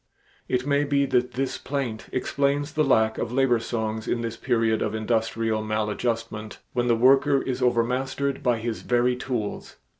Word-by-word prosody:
It 125 0 0
may 140 0 +2
be 140 -1 +2
that 125 -2 +1
this 135 +2 -2
plaint 130 -6 -3
explains 140 +3 0
the 155 - +2
lack 110 -5 +2
of 115 - -2
labor 125 -2 +3
songs 110 -1 -3
in 120 - 0
this 115 -1 -3
period 115 -3 +1
of 110 - -1
industrial 110 0 0
maladjustment 110 0 -2 0.2
when 120 -1 0
the 120 - +4
worker 135 +4 +4
is 130 -1 -3
overmastered 130 +3 0
by 120 -2 +2
his 115 0 -4
very 125 +1 +2
tools. 125 -4 -4
120 Hz, 160 wpm, -25 LUFS, 110-135 Hz, 0.2 s, the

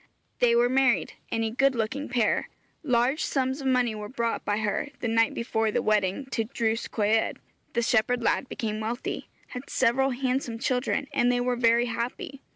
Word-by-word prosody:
They 235 -1 +4
were 240 +1 +4
married 260 -1 +2 0.2
a 225 -1 0
good 270 +3 +2
looking 250 +6 -2
pair. 240 -3 +1 0.3
Large 255 +1 +1
sums 265 +1 -1
of 270 - -2
money 250 -3 +2
were 210 -1 -6
brought 235 -2 -2
by 205 - 0
her, 210 +5 -1
the 245 - -2
night 225 0 +2
before 225 -1 0
the - - 0
wedding, 210 +4 +1
to 225 - 0
Drws 225 -2 -1
Coed. 220 +1 +1 0.4
The 235 - +1
shepherd 240 +1 +2
lad 260 - +1
became 215 -2 -3
wealthy, 230 +3 -4 0.2
had 250 +2 -8
several 260 +2 +2
handsome 255 -2 -1
children, 250 +4 0
and 245 +1 +3
they 245 - +1
were 245 0 0
very 235 0 +3
happy. 245 +3 -4
240 Hz, 175 wpm, -27 LUFS, 225-255 Hz, 0.4 s, They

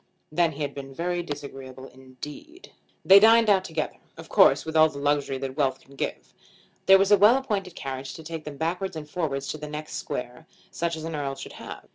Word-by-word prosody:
Then 165 0 +2
he 150 +1 -4
had 140 - -3
been 135 -1 -9
very 175 +2 -1
disagreeable 135 -4 -8
indeed. 145 - -12 0.3
They 195 +1 +9
dined 225 0 +6
out 190 -2 +3
together, 160 -4 -4 0.2
of - - -11
course - - +5
with 160 0 -5
all 155 0 +6
the 145 - -10
luxury 140 -1 0
that 130 0 -5
wealth 135 -3 0
can 140 - -20
give. - - -5 0.5
There 195 0 +9
was 195 +1 +2
a 205 - +8
well 215 +6 +7
appointed 200 -9 -3
carriage 135 -1 -6
to 160 - -10
take 160 0 -6
them 150 -2 -8
backwards 180 +4 -2
and 155 -2 -7
forwards 145 -5 -3
to 155 - -4
the 150 0 -7
next 150 +1 -6
square, 125 +6 -6 0.2
such 170 0 -2
as 160 - -7
an 165 0 -5
Earl 140 -2 -3
should - - -9
have. - - -10
155 Hz, 215 wpm, -26 LUFS, 140-180 Hz, 0.5 s, They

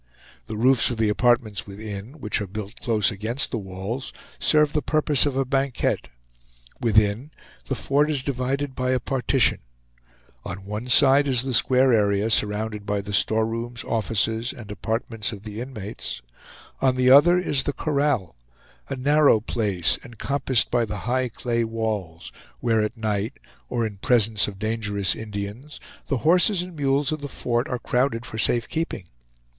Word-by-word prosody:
The 110 - -5
roofs 125 +2 +3
of 120 - -3
the 110 -1 +2
apartments 120 -2 +1
within, 105 +3 -7
which 115 -9 -2
are 100 - -4
built 105 +2 -7
close 110 -4 +1
against 110 +6 -3
the 115 - -1
walls, 95 +6 -5 0.3
serve 150 -1 +3
the 150 - +1
purpose 150 -2 +2
of 140 - -2
a 135 0 +1
banquette. 135 0 0 0.7
Within, 110 +3 +2 0.4
the 135 - -2
fort 140 +6 +1
is 140 -4 -1
divided 135 +1 -2
by 130 0 0
a 130 - +1
partition; 130 +1 +1 0.8
on 95 +2 -7
one 105 +4 -5
side 140 +2 +5
is 130 -3 +1
the 130 -1 -3
square 130 +1 +4
area 105 0 +2
surrounded 105 0 0
by 100 0 -1
the 100 +1 -7
storerooms, 115 +3 0
offices, 115 +1 0
and 110 -6 -10
apartments 110 +1 -3
of 100 -2 -9
the 105 +1 -6
inmates; 105 - -6 0.6
on 130 -1 +3
the 130 0 +4
other 170 +6 +7
is 150 -6 +1
the 145 - -1
corral, 140 - 0 0.5
a 135 - -2
narrow 145 -2 +4
place, 105 -5 0
encompassed 130 +1 0
by 120 -1 +3
the 105 -2 -4
high 125 +1 0
clay 115 0 -1
walls, 110 -7 -3 0.3
where 115 -2 +2
at 105 +3 -2
night, 105 -1 -1 0.4
or 120 -2 0
in 105 -2 -5
presence 110 0 +2
of 100 -2 -7
dangerous 105 -4 -1
Indians, 105 +6 -6 0.3
the 140 - 0
horses 180 +3 +4
and 180 -1 -10
mules 140 0 +1
of 155 -1 -3
the 145 - -4
fort 120 -1 -1
are 125 - -2
crowded 125 -1 0
for 110 -3 -7
safe 120 +1 +1
keeping. 160 - -3
115 Hz, 160 wpm, -24 LUFS, 105-135 Hz, 0.8 s, other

